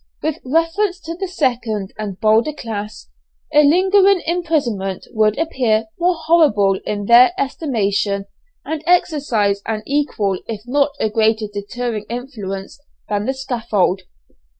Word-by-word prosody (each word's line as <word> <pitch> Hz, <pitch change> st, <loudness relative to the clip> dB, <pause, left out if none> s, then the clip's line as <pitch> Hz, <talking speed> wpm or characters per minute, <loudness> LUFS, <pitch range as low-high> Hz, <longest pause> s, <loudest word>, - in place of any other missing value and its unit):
With 315 Hz, -1 st, -1 dB
reference 330 Hz, +7 st, 0 dB
to 330 Hz, +1 st, -6 dB
the 385 Hz, +2 st, -4 dB
second 240 Hz, -, -1 dB
and 205 Hz, -3 st, -6 dB
bolder 220 Hz, +7 st, +3 dB
class, 215 Hz, -5 st, -6 dB, 0.5 s
a 300 Hz, -, +7 dB
lingering 380 Hz, +4 st, +4 dB
imprisonment 280 Hz, -, -1 dB
would 215 Hz, -1 st, +2 dB
appear 245 Hz, -8 st, +1 dB
more 355 Hz, +1 st, +2 dB
horrible 210 Hz, -, +4 dB
in 205 Hz, -1 st, -2 dB
their 240 Hz, -, +7 dB
estimation, 205 Hz, -, -1 dB, 0.4 s
and 315 Hz, -1 st, -3 dB
exercise 275 Hz, -, +2 dB
an 215 Hz, -1 st, -2 dB
equal 245 Hz, -10 st, 0 dB
if 215 Hz, -2 st, -5 dB
not 280 Hz, +3 st, +1 dB
a -, -, +1 dB
greater 220 Hz, 0 st, +2 dB
deterring 215 Hz, +1 st, -4 dB
influence 225 Hz, -4 st, -6 dB, 0.3 s
than 205 Hz, 0 st, -1 dB
the 265 Hz, -, +1 dB
scaffold. 230 Hz, -8 st, 0 dB
240 Hz, 125 wpm, -19 LUFS, 210-310 Hz, 0.5 s, a